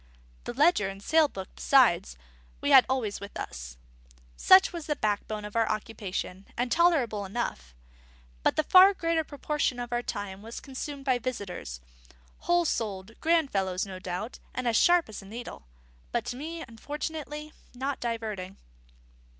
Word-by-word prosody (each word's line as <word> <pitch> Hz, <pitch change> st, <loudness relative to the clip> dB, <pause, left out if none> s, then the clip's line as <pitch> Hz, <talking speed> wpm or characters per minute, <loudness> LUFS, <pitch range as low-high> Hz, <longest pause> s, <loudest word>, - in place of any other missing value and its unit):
The -, -, -4 dB
ledger 295 Hz, -, +4 dB
and 195 Hz, 0 st, -8 dB
sale 315 Hz, +9 st, +4 dB
book, 190 Hz, -8 st, -7 dB
besides, 195 Hz, -, +3 dB, 0.4 s
we 285 Hz, -, 0 dB
had 265 Hz, -2 st, +8 dB
always 245 Hz, -6 st, -1 dB
with 200 Hz, 0 st, -8 dB
us. -, -, -7 dB, 0.6 s
Such 375 Hz, -1 st, +6 dB
was 335 Hz, -3 st, -6 dB
the 300 Hz, -, 0 dB
backbone 210 Hz, -2 st, -2 dB
of 210 Hz, -, -9 dB
our 225 Hz, -1 st, +2 dB
occupation, 200 Hz, -3 st, -4 dB
and 245 Hz, 0 st, -1 dB
tolerable 295 Hz, -12 st, +3 dB
enough; 190 Hz, -, -4 dB, 0.7 s
but -, -, +2 dB
the 310 Hz, -, +2 dB
far 375 Hz, +5 st, +7 dB
greater 330 Hz, -2 st, 0 dB
proportion 290 Hz, -3 st, -2 dB
of 245 Hz, 0 st, -4 dB
our 240 Hz, -, +1 dB
time 205 Hz, -4 st, -5 dB
was 225 Hz, +2 st, -7 dB
consumed 275 Hz, +1 st, -7 dB
by 255 Hz, -2 st, +2 dB
visitors, 185 Hz, -, -5 dB, 0.6 s
whole 345 Hz, 0 st, +2 dB
souled, 205 Hz, -7 st, -2 dB
grand 325 Hz, -3 st, +2 dB
fellows 190 Hz, -1 st, 0 dB
no 190 Hz, -2 st, -8 dB
doubt, 185 Hz, +6 st, -5 dB, 0.2 s
and 255 Hz, -1 st, -2 dB
as 230 Hz, -, +2 dB
sharp 350 Hz, +6 st, +5 dB
as 215 Hz, -2 st, -8 dB
a -, -, -13 dB
needle, 230 Hz, -, -8 dB, 0.4 s
but -, -, -1 dB
to -, -, -4 dB
me 325 Hz, +5 st, -6 dB
unfortunately 300 Hz, +5 st, -6 dB, 0.2 s
not 270 Hz, +2 st, -3 dB
diverting. 215 Hz, -5 st, -4 dB
240 Hz, 160 wpm, -28 LUFS, 200-295 Hz, 0.7 s, had